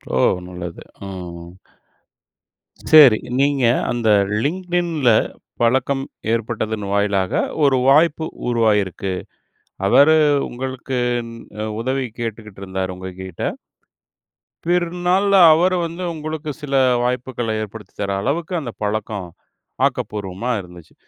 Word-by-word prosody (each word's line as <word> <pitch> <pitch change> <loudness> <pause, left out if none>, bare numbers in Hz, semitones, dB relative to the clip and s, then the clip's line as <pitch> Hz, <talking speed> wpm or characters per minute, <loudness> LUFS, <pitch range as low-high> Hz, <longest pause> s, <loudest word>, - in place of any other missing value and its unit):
ஓ! - - +2 0.3
நல்லது. 90 -2 -7 0.2
ஆ. - - -6 1.8
சேரி. 140 -8 +9 0.2
நீங்க, 140 -2 +2 0.3
அந்த 120 -2 -1 0.4
Linkedinல 175 -4 0 0.5
பழக்கம் 130 +3 +1 0.3
ஏற்பட்டதன் 110 -2 -2
வாயிலாக 100 -2 +1 0.3
ஒரு 135 -2 +4
வாய்ப்பு 160 +2 +4 0.2
உருவாகியிருக்கு. 105 -5 +1 0.7
அவரு 145 +9 +6 0.3
உங்களுக்கு 130 +1 -4 0.2
இந் 115 0 -9 0.3
அ - - -1 0.2
உதவி 130 +1 -1 0.2
கேட்டுக்கிட்டு 110 -3 -6
இருந்தாரு, 95 0 -3
உங்ககிட்ட. 95 -1 -8 1.2
பிறநாள்ல 180 +3 +1 0.2
அவர 175 +4 +3
வந்து 170 +2 -6
உங்களுக்கு 155 -1 -5
சில 140 -2 -3 0.3
வாய்ப்புகள 125 -1 -2
ஏற்படுத்தி 110 0 -9
தர 100 0 -1
அளவுக்கு 165 - -2
அந்த 120 -4 -5
பழக்கம், 105 -2 -3 0.6
ஆக்கப்பூர்வமா 105 +3 -4
இருந்துச்சு. 90 -2 -14
120 Hz, 95 wpm, -20 LUFS, 105-150 Hz, 1.8 s, சேரி